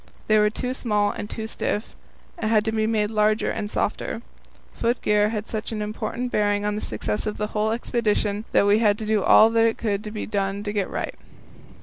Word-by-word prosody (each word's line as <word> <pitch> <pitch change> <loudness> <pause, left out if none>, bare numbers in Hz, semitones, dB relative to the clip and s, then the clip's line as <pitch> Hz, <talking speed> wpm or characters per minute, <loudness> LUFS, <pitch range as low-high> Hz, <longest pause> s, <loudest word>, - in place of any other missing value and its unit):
They 215 0 +4
were 210 0 +4
too 250 +4 -3
small 210 -5 +1
and 205 - -6
too 220 - -5
stiff, 220 -1 -3 0.4
and 280 -11 -2
had 215 -1 +3
to 220 - 0
be 220 -1 0
made 215 -1 +1
larger 215 0 +2
and 205 - -3
softer. 225 +2 -2 0.5
Foot 235 +2 0
gear 210 0 +3
had 215 0 -4
such 220 0 -4
an 220 - -3
important 215 +3 -3
bearing 205 -1 +1
on 210 - 0
the 210 - -3
success 105 -2 -3
of 210 - -3
the 210 - -1
whole 215 0 +1
expedition 215 -3 0
that - - +4
we 205 +1 +4
had 210 -2 +3
to 220 - -5
do 215 -1 +2
all 220 +3 +6
that 225 0 +3
could 210 -1 -2
be 215 - -4
done 200 -1 -2
to 205 -1 -3
get 200 -3 0
it - - -13
right. - - -3
215 Hz, 220 wpm, -24 LUFS, 205-220 Hz, 0.5 s, all